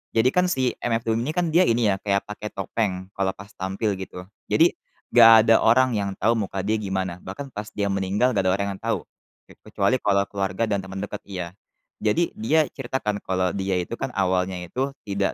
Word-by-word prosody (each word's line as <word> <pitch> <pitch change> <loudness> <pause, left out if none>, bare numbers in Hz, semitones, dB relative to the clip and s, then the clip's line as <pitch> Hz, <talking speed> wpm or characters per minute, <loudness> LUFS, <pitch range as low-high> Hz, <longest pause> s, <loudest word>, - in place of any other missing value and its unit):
jadi 115 +2 +4
kan 180 0 +3
si 130 -6 +1
MF 115 -1 0
Doom 115 0 +1
ini 130 - -3
kan 175 -2 0
dia 175 - +6
ini 115 0 +2
ya, 95 - -5
kayak 100 -1 0
pakai 105 0 -6
topeng 95 -5 -2
kalau 95 -1 0
pas 100 +1 -12
tampil, 95 +3 -2
gitu. 90 -1 -8 0.2
Jadi, - - +4 0.4
nggak 115 -1 +9
ada 115 - +6
orang 125 +3 +4
yang 100 -2 -1
tahu 115 - +3
muka 95 -4 -2
dia 110 +1 +1
gimana. 95 -3 -3
Bahkan 140 -2 -8
pas 105 +1 -6
dia 100 -1 0
meninggal, 100 +6 +1
nggak 100 - +2
ada - - +3
orang 100 0 -1
yang 95 - -12
tahu, - - 0 0.5
ke - - -17 0.2
kecuali 120 +6 +1
kalau 100 -1 +3
keluarga 95 +2 -2
dan 100 -3 -1
teman 95 0 -8
dekat, - - -6
iya. 90 -2 -5 0.5
Jadi 140 +11 +2
dia 160 -8 +3
cerita 130 0 -4
kan 105 -1 -1
kalau 95 -1 +1
dia 95 0 -1
itu 115 +7 -6
kan 125 - -4
awalnya 95 -1 0
itu 135 +7 -2
tidak 100 -1 -1
105 Hz, 210 wpm, -24 LUFS, 95-120 Hz, 0.5 s, nggak